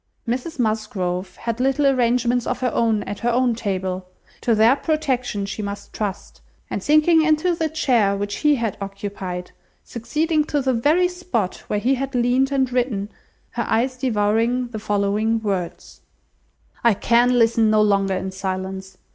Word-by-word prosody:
Mrs 255 Hz, +8 st, -3 dB
Musgrove 215 Hz, -6 st, -2 dB
had 230 Hz, 0 st, -4 dB
little 270 Hz, +2 st, +1 dB
arrangements 245 Hz, -2 st, +2 dB
of -, -, -2 dB
her 250 Hz, -2 st, +1 dB
own 225 Hz, -3 st, +1 dB
at 205 Hz, -, -6 dB
her 240 Hz, -, 0 dB
own 245 Hz, 0 st, +2 dB
table; 190 Hz, -4 st, -3 dB, 0.3 s
to 235 Hz, -, +2 dB
their 225 Hz, +4 st, +5 dB
protection 260 Hz, -10 st, -1 dB
she 205 Hz, +2 st, -5 dB
must 200 Hz, 0 st, -6 dB
trust, 205 Hz, -3 st, -5 dB, 0.3 s
and -, -, -2 dB
sinking 310 Hz, +2 st, +4 dB
into 315 Hz, +3 st, +2 dB
the 320 Hz, -1 st, -1 dB
chair 240 Hz, -10 st, +2 dB
which 205 Hz, 0 st, -3 dB
he 300 Hz, -1 st, +3 dB
had 230 Hz, -5 st, -2 dB
occupied, 195 Hz, -2 st, -6 dB, 0.3 s
succeeding 300 Hz, +7 st, -1 dB
to 295 Hz, -, -1 dB
the 260 Hz, -1 st, +1 dB
very 300 Hz, +10 st, +3 dB
spot 355 Hz, -, -3 dB
where 210 Hz, -, -1 dB
he 240 Hz, +6 st, +1 dB
had 270 Hz, 0 st, -3 dB
leaned 250 Hz, +3 st, +2 dB
and 265 Hz, -2 st, +1 dB
written, 225 Hz, -5 st, -1 dB, 0.4 s
her 235 Hz, -, -2 dB
eyes 250 Hz, +4 st, +1 dB
devoured 235 Hz, 0 st, 0 dB
the 220 Hz, -, -5 dB
following 210 Hz, +2 st, 0 dB
words: 190 Hz, -5 st, -4 dB, 0.8 s
"I 235 Hz, -3 st, +4 dB
can 240 Hz, +4 st, +3 dB
listen 225 Hz, -1 st, +3 dB
no 215 Hz, 0 st, +4 dB
longer 195 Hz, -2 st, +2 dB
in 190 Hz, +1 st, -3 dB
silence. 190 Hz, 0 st, -5 dB
230 Hz, 160 wpm, -22 LUFS, 205-260 Hz, 0.8 s, their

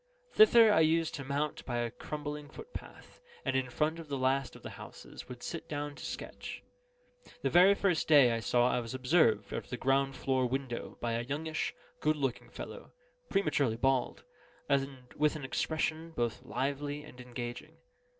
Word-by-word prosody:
Thither 235 Hz, -, +7 dB
I -, -, +5 dB
used 160 Hz, 0 st, +3 dB
to 135 Hz, -, -4 dB
mount 140 Hz, +2 st, -2 dB
by 120 Hz, -2 st, -3 dB
a 120 Hz, -1 st, -1 dB
crumbling 150 Hz, +2 st, -6 dB
footpath, 470 Hz, -, -11 dB, 0.2 s
and -, -, 0 dB
in 130 Hz, -1 st, +1 dB
front 155 Hz, +6 st, 0 dB
of 165 Hz, -, -8 dB
the 140 Hz, -1 st, -2 dB
last 135 Hz, +1 st, +1 dB
of -, -, -13 dB
the -, -, -6 dB
houses, -, -, -10 dB
would 125 Hz, -1 st, -9 dB
sit 165 Hz, -, -5 dB
down 145 Hz, -1 st, -3 dB
to -, -, -11 dB
sketch. -, -, -6 dB, 0.8 s
The -, -, +1 dB
very 185 Hz, +3 st, +7 dB
first 185 Hz, -5 st, +1 dB
day 140 Hz, -6 st, +7 dB
I 115 Hz, -, 0 dB
saw 120 Hz, +2 st, +2 dB
I 125 Hz, -, +2 dB
was 120 Hz, +2 st, -5 dB
observed, 125 Hz, -, +3 dB
out -, -, -3 dB
of -, -, -21 dB
the 125 Hz, -, -3 dB
ground 135 Hz, +1 st, +2 dB
floor 130 Hz, -1 st, +1 dB
window 130 Hz, -1 st, -4 dB
by 120 Hz, -, -1 dB
a 115 Hz, 0 st, 0 dB
youngish, 155 Hz, +5 st, -3 dB, 0.2 s
good 155 Hz, 0 st, +2 dB
looking 135 Hz, -4 st, -2 dB
fellow, -, -, -9 dB, 0.4 s
prematurely 140 Hz, -, +1 dB
bald, 135 Hz, 0 st, +1 dB, 0.4 s
and 135 Hz, -2 st, -1 dB
with 150 Hz, +1 st, +3 dB
an 150 Hz, -3 st, -5 dB
expression 160 Hz, +3 st, -1 dB
both 120 Hz, -1 st, -1 dB
lively 145 Hz, +3 st, -2 dB
and 125 Hz, -4 st, -12 dB
engaging. 120 Hz, -1 st, -7 dB
140 Hz, 180 wpm, -32 LUFS, 125-155 Hz, 0.8 s, Thither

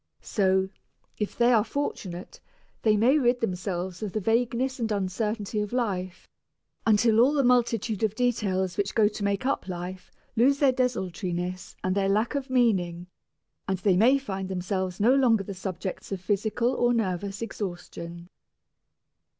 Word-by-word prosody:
So, 190 Hz, -2 st, +1 dB, 0.5 s
if 210 Hz, -, -3 dB
they 240 Hz, +1 st, +4 dB
are 220 Hz, -3 st, +5 dB
fortunate, 210 Hz, -7 st, -5 dB, 0.4 s
they 215 Hz, -2 st, +3 dB
may 255 Hz, +8 st, +4 dB
rid 245 Hz, -2 st, +2 dB
themselves 185 Hz, -3 st, -3 dB
of 210 Hz, -3 st, -4 dB
the 215 Hz, -, 0 dB
vagueness 240 Hz, +5 st, 0 dB
and 225 Hz, -2 st, -1 dB
uncertainty 210 Hz, +2 st, -2 dB
of 210 Hz, -, -4 dB
life, 190 Hz, -7 st, -2 dB, 0.6 s
until 220 Hz, +1 st, +4 dB
all 260 Hz, +5 st, +5 dB
the 285 Hz, -2 st, +2 dB
multitude 235 Hz, -4 st, +2 dB
of 220 Hz, -1 st, +1 dB
details 200 Hz, -7 st, 0 dB
which 200 Hz, -1 st, -1 dB
go 215 Hz, -2 st, +5 dB
to 210 Hz, 0 st, -4 dB
make 200 Hz, +3 st, 0 dB
up 275 Hz, -7 st, -1 dB
life 180 Hz, 0 st, -6 dB, 0.2 s
lose 260 Hz, +5 st, +4 dB
their 280 Hz, -2 st, +4 dB
desultoriness 185 Hz, -7 st, -2 dB
and 185 Hz, -, +1 dB
their 195 Hz, 0 st, +1 dB
lack 215 Hz, +6 st, +1 dB
of 280 Hz, -2 st, -3 dB
meaning, 190 Hz, -9 st, +1 dB, 0.6 s
and 190 Hz, -, 0 dB
they 185 Hz, 0 st, +2 dB
may 240 Hz, +9 st, +5 dB
find 195 Hz, -8 st, -5 dB
themselves 185 Hz, 0 st, -2 dB
no 230 Hz, +5 st, +5 dB
longer 240 Hz, -6 st, +4 dB
the 200 Hz, -, -6 dB
subjects 190 Hz, 0 st, -5 dB
of 195 Hz, -, -2 dB
physical 215 Hz, +6 st, 0 dB
or 240 Hz, 0 st, +2 dB
nervous 195 Hz, -1 st, -2 dB
exhaustion. 175 Hz, -5 st, -6 dB
205 Hz, 155 wpm, -27 LUFS, 185-235 Hz, 0.6 s, are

